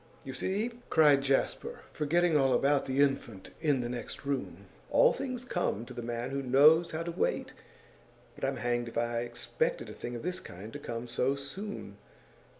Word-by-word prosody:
you 130 - -5
see!' 200 - -1 0.2
cried 150 -3 +6
Jasper, 135 0 0
forgetting 165 +2 +2
all 135 -3 +4
about 140 0 +2
the 135 +1 +2
infant 120 -8 0
in 145 -5 +2
the 120 - -2
next 125 +3 -5
room, 100 -10 -3 0.2
'all - - +5
things 255 -2 -4
come 175 - -1
to 125 - -10
the 120 - -5
man 120 +1 -3
who 140 0 -1
knows 150 +6 +6
how 160 +1 -3
to 170 - -3
wait. - - -1 0.8
But - - -14
I'm - - 0
hanged 120 0 -1
if 115 - -6
I 120 0 0
expected 120 0 -2
a - - -8
thing 120 - -6
of 120 - -6
this 180 +2 -2
kind 95 +5 -10
to - - -6
come 115 +1 -5
so 130 +3 +1
soon! 140 - -6
135 Hz, 185 wpm, -31 LUFS, 120-160 Hz, 0.8 s, cried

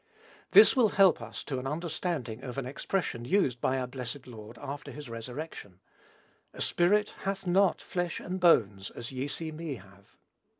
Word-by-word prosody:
This 425 - +8
will 240 -5 +5
help 190 -9 +6
us 115 -1 -6
to 135 -3 -3
an 130 - -4
understanding 150 -6 -3
of 130 -1 -7
an 135 - -2
expression 140 -1 -2
used 125 - +1
by 130 - +1
our 130 - -1
blessed 125 +1 -6
Lord 110 -2 -11
after 145 +2 -6
his 145 -5 -8
resurrection, 115 - -7 0.7
"A - - -8
spirit 205 +4 +2
hath 195 0 -3
not 185 +1 +3
flesh 175 -2 -2
and 185 +1 -4
bones, 105 - +4
as 120 - -7
ye 130 +1 -3
see 160 +2 -4
me 155 -2 -5
have." 100 -1 -17
140 Hz, 170 wpm, -30 LUFS, 120-175 Hz, 0.7 s, This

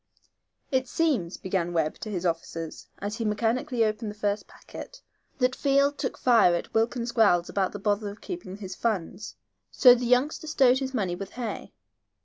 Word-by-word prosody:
"It 260 -1 +1
seems," 245 - 0
began 180 -2 -2
Webb, 160 -2 0
to 215 - -6
his 185 -3 -3
officers, 165 -1 -3
as 205 +2 -4
he 230 - -2
mechanically 230 +3 0
opened 215 +1 -2
the 205 - -8
first 205 0 -2
packet, - - -11 0.3
"that 255 0 +1
Field 280 +1 +2
took 260 - -2
fire 230 -8 +5
at 170 - -5
Wilkins's 235 +1 0
growls 200 -7 +3
about 195 -2 0
the - - -6
bother 205 +1 0
of 205 - -10
keeping 345 - -7
his 190 -3 -7
funds, 210 -2 -3 0.3
so 250 -2 +7
the 245 0 -1
youngster 255 +6 +1
stowed 265 -4 +4
his 265 -1 -4
money 190 -7 0
with 195 +2 -7
Hay. 240 -3 -6
220 Hz, 175 wpm, -27 LUFS, 195-255 Hz, 0.3 s, so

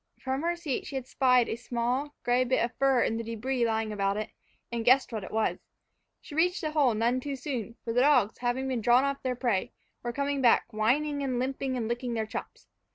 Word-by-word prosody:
From 265 +1 -2
her 340 +1 0
seat 320 -7 -3
she 280 - -7
had 265 -2 -3
spied 250 -2 +3
a - - -2
small, 245 +4 -2
gray 245 +1 +3
bit 255 -1 +2
of 240 - -7
fur 270 -2 +4
in 225 - 0
the 230 - -3
debris 235 +2 -1
lying 220 -1 -1
about 200 0 0
it, 215 - -4 0.4
and 235 -1 -2
guessed 255 +3 +4
what 215 -3 -3
it - - -7
was. 220 0 0 0.6
She - - -12
reached 355 +4 +2
the 310 - -2
hole 280 -7 +3
none 235 +4 +1
too 280 +1 -4
soon; 250 -4 -5
for 230 - -2
the 245 - +3
dogs, 255 -7 +3
having 250 +2 -1
been 255 -3 -1
drawn 240 +4 +5
off 275 0 -1
their 255 -1 -1
prey, 235 -6 -1 0.3
were 240 - -3
coming 280 +1 -1
back, 240 -3 +5
whining 285 +7 +1
and 260 -3 -1
limping 260 +1 -2
and 225 -3 -2
licking 240 +1 -2
their 220 -1 -1
chops. 215 - -7
250 Hz, 225 wpm, -28 LUFS, 230-270 Hz, 0.6 s, drawn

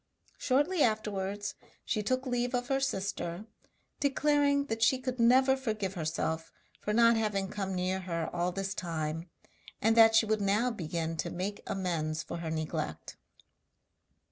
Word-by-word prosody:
Shortly 295 +7 +2
afterwards 205 -3 0 0.3
she 215 - 0
took 255 +5 -1
leave 245 0 0
of 245 0 -2
her 270 0 +2
sister, 195 -6 -2 0.5
declaring 285 0 +2
that 225 -4 -3
she 255 +3 +4
could 255 -1 -4
never 260 +3 +5
forgive 215 -7 -2
herself 160 -1 -2 0.3
for 210 - -3
not 230 +1 +5
having 200 -3 0
come 195 -2 -3
near 185 +1 0
her 170 -3 -3
all 175 +1 0
this 195 +1 -3
time, 165 -2 -3 0.5
and 225 +2 +3
that 225 -1 +7
she 225 - +6
would 215 -1 0
now 210 +5 +2
begin 165 -4 -3
to - - -2
make 195 +3 -4
amends 160 -5 -2
for - - -6
her 170 -1 -4
neglect. 155 -1 -4
205 Hz, 150 wpm, -31 LUFS, 175-245 Hz, 0.5 s, that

